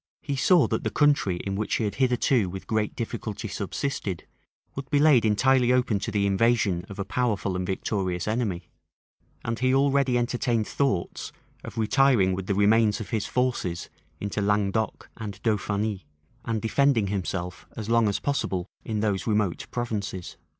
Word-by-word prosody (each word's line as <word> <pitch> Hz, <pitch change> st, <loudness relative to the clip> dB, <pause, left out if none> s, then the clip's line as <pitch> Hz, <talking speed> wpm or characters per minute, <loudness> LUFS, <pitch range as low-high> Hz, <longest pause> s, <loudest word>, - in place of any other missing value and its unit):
He 140 Hz, -, -2 dB
saw 170 Hz, +5 st, +5 dB
that -, -, -1 dB
the -, -, 0 dB
country 145 Hz, -, +2 dB
in 100 Hz, -1 st, -2 dB
which 105 Hz, +1 st, -1 dB
he -, -, 0 dB
had 105 Hz, -, -1 dB
hitherto 125 Hz, -4 st, +2 dB
with 95 Hz, +1 st, -7 dB
great 110 Hz, -1 st, -1 dB
difficulty 115 Hz, -2 st, -4 dB
subsisted, 100 Hz, -, -3 dB, 0.5 s
would 135 Hz, 0 st, -7 dB
be 145 Hz, -, +2 dB
laid 145 Hz, -6 st, +5 dB
entirely 125 Hz, +4 st, +3 dB
open 125 Hz, -5 st, +2 dB
to 110 Hz, -, -3 dB
the 100 Hz, -2 st, +1 dB
invasion 100 Hz, -3 st, +2 dB
of 100 Hz, -, -8 dB
a 100 Hz, -, -3 dB
powerful 105 Hz, -4 st, -1 dB
and 90 Hz, 0 st, -2 dB
victorious 95 Hz, -2 st, -2 dB
enemy; 105 Hz, -6 st, -2 dB, 0.7 s
and 115 Hz, 0 st, -2 dB
he 130 Hz, +1 st, +3 dB
already 135 Hz, -2 st, +3 dB
entertained 120 Hz, -2 st, 0 dB
thoughts 135 Hz, -11 st, -1 dB, 0.3 s
of -, -, -9 dB
retiring 110 Hz, -4 st, +3 dB
with 95 Hz, 0 st, -4 dB
the 100 Hz, -, +1 dB
remains 105 Hz, +1 st, +4 dB
of 110 Hz, -, -7 dB
his 110 Hz, -2 st, -1 dB
forces 120 Hz, -9 st, -1 dB, 0.3 s
into 100 Hz, +1 st, -3 dB
Languedoc 105 Hz, +1 st, 0 dB
and 105 Hz, -3 st, -6 dB
Dauphiny, 105 Hz, -4 st, -1 dB, 0.4 s
and 115 Hz, -2 st, -2 dB
defending 125 Hz, -1 st, +3 dB
himself 90 Hz, -2 st, -4 dB
as 110 Hz, -2 st, -5 dB
long 115 Hz, -1 st, +3 dB
as 100 Hz, -, +1 dB
possible 95 Hz, -10 st, -1 dB, 0.2 s
in 110 Hz, -2 st, -2 dB
those 105 Hz, -2 st, -1 dB
remote 105 Hz, -5 st, 0 dB
provinces. 105 Hz, -7 st, -4 dB
110 Hz, 165 wpm, -26 LUFS, 100-125 Hz, 0.7 s, saw